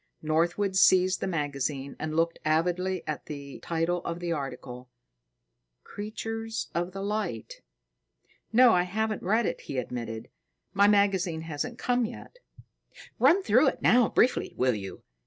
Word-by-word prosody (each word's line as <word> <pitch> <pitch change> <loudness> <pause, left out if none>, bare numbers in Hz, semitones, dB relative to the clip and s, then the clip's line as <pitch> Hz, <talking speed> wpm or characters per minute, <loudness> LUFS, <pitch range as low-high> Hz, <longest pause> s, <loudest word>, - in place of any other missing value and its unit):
Northwood 175 +5 +1
seized 185 0 +5
the - - -1
magazine 140 -4 -3
and 155 0 -3
looked 165 +1 +1
avidly 180 +4 0
at 155 - -5
the 140 -2 -8
title 170 +1 -1
of 170 0 -4
the 175 -1 -3
article, 125 -4 -6 0.9
"Creatures 225 +2 -5
of 175 +1 -2
the 195 +1 -6
Light." 200 - -4 0.9
"No, 245 +1 +6
I 180 - +4
haven't 215 +4 -2
read 220 +5 +1
it," - - -3
he 135 - -6
admitted. 115 -3 -5 0.4
"My 200 +1 +5
magazine 195 -5 +2
hasn't 165 +10 -5
come 245 -2 +1
yet." - - -11 0.8
"Run 390 +2 +5
through 255 - +4
it - - -1
now 245 -2 +5
briefly, 250 - +1
will 130 0 +2
you? 95 -3 -7
175 Hz, 140 wpm, -28 LUFS, 150-210 Hz, 0.9 s, No